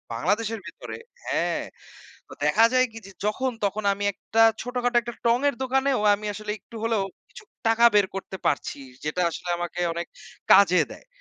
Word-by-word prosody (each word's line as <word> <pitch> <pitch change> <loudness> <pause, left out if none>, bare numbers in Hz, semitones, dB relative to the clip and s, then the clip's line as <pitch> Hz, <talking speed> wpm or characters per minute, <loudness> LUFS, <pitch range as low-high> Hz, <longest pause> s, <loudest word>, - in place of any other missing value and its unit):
বাংলাদেশের 210 - 0
ভেতরে - - -8 0.3
হ্যাঁ। - - -1 0.6
তো - - -13
দেখা 225 - +5
যায় 255 0 +4
কি 225 - -8
যে, 195 - -12
যখন, 260 +5 0
তখন 205 +1 -1
আমি 205 +1 -4
একটা 225 +3 +1 0.2
ছোটখাটো 245 -1 -1
একটা 235 0 -6
টঙের 250 +5 +3
দোকানেও 265 -1 +1
আমি 210 +1 -6
আসলে 215 0 -4
একটু 230 - -13
হলেও 225 -4 +1 0.3
কিছু - - -13 0.2
টাকা 225 +1 +4
বের 205 -2 +5
করতে 190 0 -6
পারছি, 145 - 0 0.3
যেটা 150 +4 -1
আসলে 175 +2 -6
আমাকে 175 0 -4
অনেক 170 +1 -3 0.5
কাজে 185 -2 +6
দেয়। - - -14
215 Hz, 165 wpm, -25 LUFS, 195-245 Hz, 0.6 s, কাজে